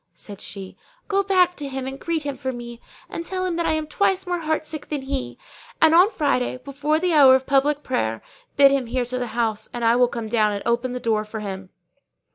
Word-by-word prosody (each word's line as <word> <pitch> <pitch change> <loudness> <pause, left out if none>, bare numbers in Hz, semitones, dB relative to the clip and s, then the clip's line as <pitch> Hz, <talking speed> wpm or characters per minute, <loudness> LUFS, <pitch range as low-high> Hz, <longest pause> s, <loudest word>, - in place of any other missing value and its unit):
Said 205 -2 -10
she, 195 -2 -8 0.3
'Go 395 -1 +2
back 365 -2 +3
to 290 - -4
him 265 -1 -4
and 270 +1 -6
greet 330 -2 -2
him 285 -1 -3
for 260 - -4
me 240 -1 -9 0.3
and 335 - -5
tell 370 +1 -3
him 360 -2 -1
that 340 - 0
I - - +2
am 315 0 -1
twice 385 +4 0
more 355 -1 -2
heartsick 310 -1 -3
than 290 -3 -3
he 270 -1 -3
is. - - -25 0.4
And 320 0 +5
on 360 +5 +6
Friday, 280 - 0
before 280 +4 -1
the 355 +1 0
hour 275 -4 +8
of 265 0 0
public 285 +2 +2
prayer, 110 - -2 0.3
bid 275 -1 +7
him 270 -3 0
here 250 +1 -1
to 255 +1 -4
the 245 - -2
house, 220 -2 -1
and 240 -1 -3
I 230 +1 +5
will 245 0 +4
come 230 -2 -5
down 215 -2 +2
and 200 - -4
open 240 +2 0
the 250 - -3
door 220 -3 0
for 215 +1 -7
him. 190 -2 -6
265 Hz, 240 wpm, -23 LUFS, 235-315 Hz, 0.4 s, hour